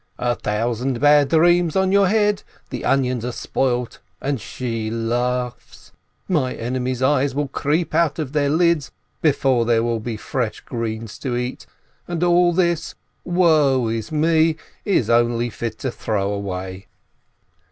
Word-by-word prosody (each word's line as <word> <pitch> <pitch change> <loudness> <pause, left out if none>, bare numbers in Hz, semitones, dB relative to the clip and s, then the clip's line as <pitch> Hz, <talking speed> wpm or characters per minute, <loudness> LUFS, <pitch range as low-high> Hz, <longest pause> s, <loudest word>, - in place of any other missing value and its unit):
"A 120 0 0
thousand 115 +4 -2
bad 145 0 +5
dreams 170 +1 +3
on 190 0 +2
your 200 -1 +4
head! 210 0 +2 0.3
The - - -5
onions 125 -3 +1
are 125 - -2
spoilt, 125 -1 -2 0.2
and 140 -4 -2
she 115 -3 -4
laughs! 120 +2 -3 0.4
My 150 -9 0
enemies' 125 +1 -2
eyes 135 0 +2
will 145 0 0
creep 150 +4 -1
out 160 -2 +2
of 150 -4 -4
their 145 -2 +2
lids 165 -1 +2 0.3
before 135 -5 +2
there 115 -1 +2
will 115 -1 0
be 110 0 -4
fresh 120 0 -3
greens 115 -2 -5
to 125 -3 -2
eat, 125 +1 -4 0.4
and 175 -1 -2
all 175 0 +4
this, 170 -1 0 0.3
woe 155 -9 +3
is 115 +2 -3
me, 160 +1 +3 0.3
is 190 - +2
only 120 0 +2
fit 115 +1 -5
to 130 - -3
throw 105 -3 -2
away!'' 95 0 -5
130 Hz, 145 wpm, -21 LUFS, 115-160 Hz, 0.4 s, bad